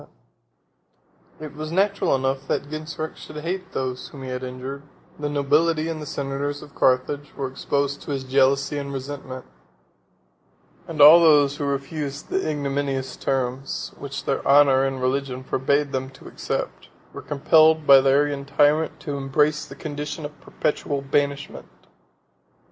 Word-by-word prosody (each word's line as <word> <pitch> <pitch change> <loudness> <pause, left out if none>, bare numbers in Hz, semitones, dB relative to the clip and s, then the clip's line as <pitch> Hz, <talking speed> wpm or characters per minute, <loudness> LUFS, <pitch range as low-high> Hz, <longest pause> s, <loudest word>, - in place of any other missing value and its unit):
] - - -36
It 150 - -9
was 155 +1 -6
natural 195 -2 +2
enough 135 +1 -2
that 145 - -2
Genseric 155 0 -5
should 155 - -11
hate 185 +4 -4
those 130 -1 -3
whom 135 -2 -11
he 130 - -6
had 125 0 -4
injured: 130 +2 -6 0.4
the 145 0 -2
nobility 155 +3 +1
and 155 -2 -5
senators 140 +1 -3
of 145 - -14
Carthage 130 +3 0
were 135 - -3
exposed 140 +2 -2
to - - -10
his 135 -2 -2
jealousy 135 +2 +2
and 140 0 -5
resentment; 135 -1 -6 1.4
and 155 -3 -2
all 155 +4 +10
those 145 -4 +5
who 145 - -3
refused 140 +1 -4
the 190 - -1
ignominious 140 -3 -2
terms, 130 0 -3
which 140 -1 -6
their 135 - -1
honor 140 -1 +5
and 135 -1 -2
religion 130 0 -1
forbade 140 +2 0
them 130 0 -3
to 135 - -15
accept, - - -4 0.2
were - - -7
compelled 155 +2 +4
by 135 -1 +8
the 135 - +2
Arian 140 0 +2
tyrant 145 +3 +2
to 145 -2 -4
embrace 150 +3 +1
the 135 - -10
condition 150 +1 -5
of 150 +1 -10
perpetual 145 -2 -2
banishment. 140 +1 -2
140 Hz, 150 wpm, -23 LUFS, 135-150 Hz, 1.4 s, all